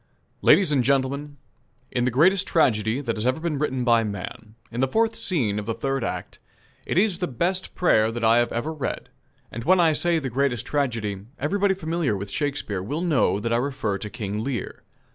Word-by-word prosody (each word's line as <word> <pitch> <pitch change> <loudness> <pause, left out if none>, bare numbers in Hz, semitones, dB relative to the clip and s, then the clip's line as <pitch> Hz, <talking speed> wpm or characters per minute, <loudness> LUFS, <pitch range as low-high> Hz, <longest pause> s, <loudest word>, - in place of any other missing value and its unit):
LADIES 190 -6 +5
AND 135 -4 +3
GENTLEMEN: 140 +2 0 0.5
In 120 - 0
the - - +3
greatest 180 +10 +4
tragedy 115 -5 +2
that 115 -5 -3
has 110 +3 -1
ever 130 +4 +1
been 160 -3 -2
written 130 -4 -1
by 115 -2 +4
man 105 +1 -6 0.2
in 120 - -5
the 135 - +3
fourth 225 +10 +1
scene 115 - 0
of 105 - -7
the 115 - -1
third 135 -2 -2
act - - -5 0.5
is 190 -1 +1
the 180 - -1
best 180 +8 -2
prayer 110 -11 +3
that 120 0 -5
I 115 +1 +5
have 120 - +1
ever 120 +8 -2
read; 150 -4 -4 0.4
and 115 - -6
when 185 +6 +4
I 165 -2 +4
say 170 +2 +2
"the 135 -5 -3
greatest 125 -2 0
tragedy," 115 -9 -2
everybody 195 +7 +1
familiar 160 - -1
with 100 0 -6
Shakespeare 140 -8 -2
will 145 - -3
know 140 - +2
that 115 +2 -1
I - - +3
refer 120 -6 -2
to 105 - -5
"King 105 +1 -4
Lear." 125 -5 -4
130 Hz, 200 wpm, -24 LUFS, 115-160 Hz, 0.5 s, LADIES